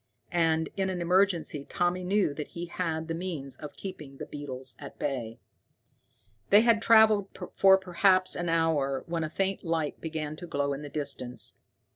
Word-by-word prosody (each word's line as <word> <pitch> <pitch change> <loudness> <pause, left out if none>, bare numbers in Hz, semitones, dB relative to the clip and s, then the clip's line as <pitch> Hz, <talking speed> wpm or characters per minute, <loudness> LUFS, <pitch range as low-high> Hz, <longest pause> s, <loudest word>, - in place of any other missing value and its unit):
And, 160 -2 +2
in 190 -1 0
an 185 -1 -3
emergency, 175 -4 +1
Tommy 175 +4 -1
knew 190 -4 +1
that 150 +1 -5
he 170 0 -6
had 165 -2 -3
the 165 - -2
means 165 -6 -5
of 150 - -9
keeping 150 -8 -8
the - - -6
beetles 130 -3 -6
at - - -10
bay. 120 -5 -3 1.1
They 205 +2 +8
had 230 -1 +4
traveled 220 -3 +5 0.3
for 190 0 +6
perhaps 185 0 +3
an 175 -1 -2
hour 155 -5 +1
when 165 -1 -2
a 155 - -3
faint 195 +3 -1
light 165 -3 -2
began 155 -2 -4
to 175 - -8
glow 140 -2 -1
in 140 - -6
the 145 - -7
distance. 140 -4 -3
165 Hz, 170 wpm, -28 LUFS, 145-185 Hz, 1.1 s, They